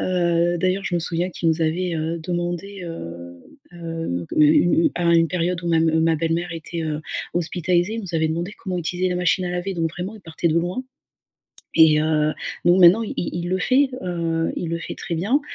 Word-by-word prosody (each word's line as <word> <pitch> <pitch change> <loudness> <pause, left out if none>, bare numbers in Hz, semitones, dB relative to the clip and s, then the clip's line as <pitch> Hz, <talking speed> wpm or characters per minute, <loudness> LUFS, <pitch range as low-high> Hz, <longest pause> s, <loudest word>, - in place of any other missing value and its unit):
Heu, 175 -1 +1
d'ailleurs, 185 +2 0
je 175 - 0
me - - 0
souviens 175 +2 -1
qu'il 165 -1 -1
nous 160 +1 +1
avait, 170 +2 0
heu, 160 +2 -2
demandé, 175 +3 -4
heu 85 - -8 0.4
heu, 165 - -4
une 155 - +6 0.4
une - - +4
à 175 - -1
1 165 -1 +4
période 180 0 -1
où 170 - -2
ma 165 -1 +3
ma 160 0 +3
belle-mère 165 +2 -1
était, 165 +1 -6
heu, 155 -1 -2 0.3
hospitalisée, 175 +3 0
il 230 - -3
nous 175 -3 -7
avait 160 0 +2
demandé 170 +5 -3
comment 185 -4 -4
utiliser 180 +2 -1
la 180 - -1
machine 180 +1 +1
à 175 - -2
laver, 180 +2 -3
donc 165 -1 -1
vraiment, 185 +5 -5
il - - -14
partait 165 +1 -2
de 165 +1 +2
loin. 180 +9 -2 0.9
Et 160 -2 +6
heu, 155 -1 +2 0.3
donc 180 +2 +5
maintenant, 185 +7 +7
il 220 - -5
il 175 0 -3
le 185 +1 0
fait, 265 +7 +3
heu, 165 -2 -1
il 170 - -3
le 170 - -1
fait 165 - -6
très 170 - -5
bien. 215 - +1
170 Hz, 210 wpm, -22 LUFS, 165-180 Hz, 0.9 s, maintenant